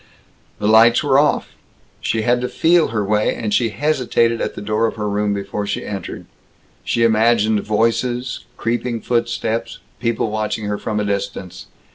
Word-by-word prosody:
The 105 - -1
lights 115 +3 +6
were 140 -2 +4
off. 150 - +1 0.5
She 110 -1 -1
had 120 +2 +2
to 125 - -2
feel 170 0 +3
her 105 -2 -2
way, 105 +1 +1
and 105 -3 -3
she 115 0 +2
hesitated 120 -3 +1
at - - -3
the - - -6
door 105 +2 +1
of - - -5
her 105 -1 -3
room 105 0 0
before 100 +1 -3
she - - -3
entered. 100 -2 -6 0.6
She 115 - 0
imagined 110 -1 +3
voices, 115 +4 0 0.2
creeping 120 0 -2
footsteps, 115 -1 -1 0.2
people 115 -2 -1
watching 110 0 -2
her 105 0 -2
from 105 -1 -2
a 105 - -1
distance. 100 -2 -4
110 Hz, 165 wpm, -19 LUFS, 105-120 Hz, 0.6 s, lights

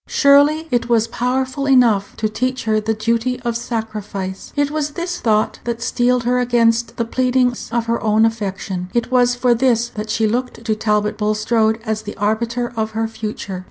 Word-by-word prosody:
Surely 290 +3 +4
it 240 -1 0
was 230 -1 +3
powerful 260 +3 -1
enough 235 -7 +3
to 215 - 0
teach 255 +4 -2
her 215 -1 +1
the 220 +1 -1
duty 230 +3 0
of 235 -2 -2
sacrifice! 215 -5 -5
It 285 0 +1
was 300 -1 -2
this 350 +1 -3
thought 215 -2 +1
that 235 -1 -3
steeled 245 +1 +1
her 250 +1 +1
against 235 -1 +1
the 230 - 0
pleadings 250 0 0
of 235 0 0
her 230 0 -1
own 220 0 +3
affection. 195 -4 -3
It 235 +1 0
was 245 -1 +3
for 245 0 +3
this 235 -1 +2
that 215 -1 -6
she 220 +1 +1
looked 245 +1 -3
to 220 -1 +1
Talbot 210 0 0
Bulstrode 220 +1 +1
as 215 0 -2
the 210 - -8
arbiter 235 +4 -1
of 220 0 -3
her 225 0 0
future. 210 -4 -6
230 Hz, 185 wpm, -19 LUFS, 215-250 Hz, -, Surely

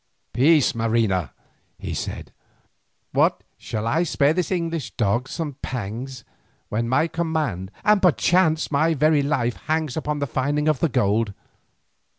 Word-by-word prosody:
"Peace, 150 +2 +4
Marina," 110 - 0 0.5
he - - -5
said. - - -5 0.8
"What, - - +2 0.2
shall 110 -1 -4
I 140 +9 +1
spare 150 -3 +2
this 180 0 -1
English 165 -5 -2
dog 115 +4 0
some 150 -5 -4
pangs, 125 +2 -5 0.5
when 115 +2 -1
my 130 +6 +3
command, 155 - -2
and 210 -1 +4
perchance 175 -2 +3
my 160 +3 +2
very 155 +1 +3
life, 135 -5 0
hangs 155 -3 0
upon 150 -1 -2
the 145 - -1
finding 145 +4 -1
of 155 -4 +2
the 165 - +2
gold? 105 -2 +1
140 Hz, 140 wpm, -23 LUFS, 115-160 Hz, 0.8 s, Peace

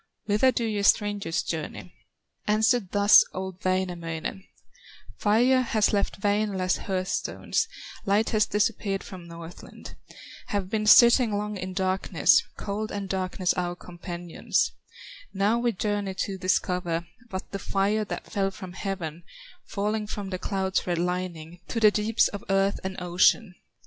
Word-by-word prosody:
Whither 215 +5 +3
do 235 - -1
ye 210 -2 -1
strangers 205 -4 +2
journey?" 160 +2 -5 0.5
Answered 220 0 +2
thus 205 +1 +7
old 185 0 -6
Wainamoinen: 180 -1 -2 0.7
"Fire 245 +5 +4
has 220 -4 +1
left 200 -1 -1
Wainola's 205 -3 +1
hearth 185 -1 -3
stones, - - -1 0.4
Light 205 +3 +2
has 215 -1 +3
disappeared 205 -2 0
from 180 -3 -10
Northland; 170 0 -11 0.5
Have 200 -2 -2
been 215 -1 0
sitting 235 -1 +7
long 210 0 -3
in 185 -1 -5
darkness, 190 0 +3 0.2
Cold 215 +2 -4
and 200 -1 -4
darkness 185 -1 -1
our 175 -1 -2
companions; 175 -1 -2 0.6
Now 205 +4 +2
we 240 0 +1
journey 205 -1 -2
to 195 +1 -2
discover 180 -2 0 0.2
What 190 -2 -6
the 195 - -4
fire 200 +3 0
that 210 - -6
fell 195 -1 -1
from 185 -2 -9
heaven, 180 -4 -4 0.4
Falling 210 +1 -2
from 205 -2 -5
the 185 - -3
cloud's 190 -1 -1
red 175 -1 0
lining, 175 -1 -3
To 230 - -2
the 215 -2 +6
deeps 215 +2 +2
of 205 - -7
earth 195 +1 +2
and 190 0 -4
ocean." 180 +3 +3
195 Hz, 140 wpm, -26 LUFS, 185-210 Hz, 0.7 s, thus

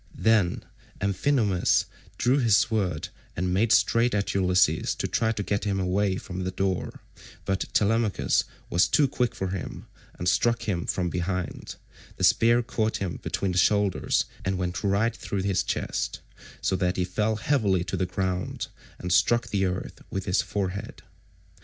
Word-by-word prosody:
Then 110 -6 +2 0.3
Amphinomus 100 0 +2 0.3
drew 130 +4 +3
his 115 -6 +4
sword 95 -9 0 0.3
and 90 +2 0
made 105 +4 +2
straight 115 0 +3
at 100 -1 0
Ulysses 90 -4 +2
to - - -2
try 115 - 0
and 105 -3 -1
get 100 0 -1
him 100 -2 0
away 95 +1 +1
from 95 0 -5
the 90 - -1
door; 95 -1 -2 0.4
but 95 0 -2
Telemachus 110 0 +2 0.3
was 85 - +4
too 145 - +3
quick 125 -2 -1
for 95 - -3
him, 95 -1 -5 0.3
and 90 - -3
struck 115 +6 +2
him 90 -5 -2
from 90 -2 -1
behind; 90 0 -3 0.4
the - - -4
spear 120 +1 +4
caught 110 -2 -1
him 90 -5 -4
between 95 - -2
the 90 - +1
shoulders 100 +2 +2 0.2
and 95 0 -1
went 90 +1 -3
right 100 +4 +1
through 100 -2 -3
his 100 -2 +1
chest, - - -3 0.4
so 95 - +1
that 90 0 0
he 90 - +1
fell 105 +4 0
heavily 105 -6 +1
to - - -4
the 95 - 0
ground 90 0 -2 0.3
and 90 0 -2
struck 120 +5 +3
the 95 -2 +1
earth 90 +1 -5
with 95 -1 -4
his 90 - +2
forehead. 100 -1 -4
95 Hz, 165 wpm, -26 LUFS, 90-110 Hz, 0.4 s, his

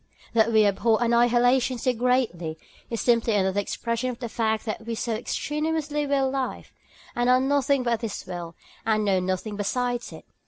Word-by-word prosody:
That 230 0 +3
we 220 -1 +5
abhor 220 +3 +2
annihilation 240 +2 +3
so 250 +2 0
greatly, 225 -10 0 0.3
is 230 - -3
simply 230 -2 +2
another 190 0 +1
expression 230 +4 -2
of 245 - -5
the 240 -2 -5
fact 220 -1 -1
that 220 0 -4
we 230 - -2
so 225 0 -2
strenuously 300 -1 -1
will 275 -1 +2
life, 265 -1 -4 0.4
and 240 +1 +1
are 255 0 +6
nothing 275 0 +2
but 235 -2 0
this 225 -3 -5
will, 175 -2 -6 0.3
and 215 -1 +1
know 195 -2 +3
nothing 185 +3 -3
besides 245 +4 -2
it. - - -11
235 Hz, 170 wpm, -25 LUFS, 215-255 Hz, 0.4 s, are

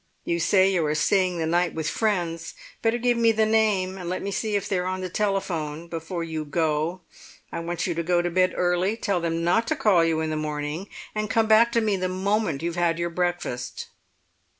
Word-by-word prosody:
You 170 0 0
say 190 +3 +4
you 175 -3 +2
are 150 - 0
staying 180 +3 +2
the 165 - -1
night 175 +2 +1
with 160 -1 -2
friends; 175 -6 -1 0.3
better 225 +1 +2
give 240 0 +1
me 230 -1 +5
the 220 0 +2
name 205 -4 +1
and 175 -1 -5
let 185 - -3
me 200 - -3
see 215 +1 -1
if 200 - -1
they're 180 -2 -1
on 185 0 -2
the 185 - -4
telephone 170 -6 -2
before 165 +1 -4
you 160 -2 -4
go. 155 +3 -1 0.5
I - - -4
want 170 0 -3
you 175 - -1
to 165 - -2
go 175 +1 +1
to 175 - -1
bed 185 +1 +2
early, 180 +4 +1
tell 200 -6 -1
them 165 0 -1
not 225 +7 +2
to 315 - +1
call 210 - +4
you 165 -1 +1
in 160 0 -1
the - - -1
morning, 150 +4 -3 0.2
and 215 -1 -2
come 225 -1 +3
back 220 +2 +5
to 230 - +3
me 210 -3 +1
the 185 0 -1
moment 190 -4 -1
you've 170 0 -2
had 170 -1 +2
your 170 0 -2
breakfast." 175 -8 -3
180 Hz, 220 wpm, -25 LUFS, 165-200 Hz, 0.5 s, me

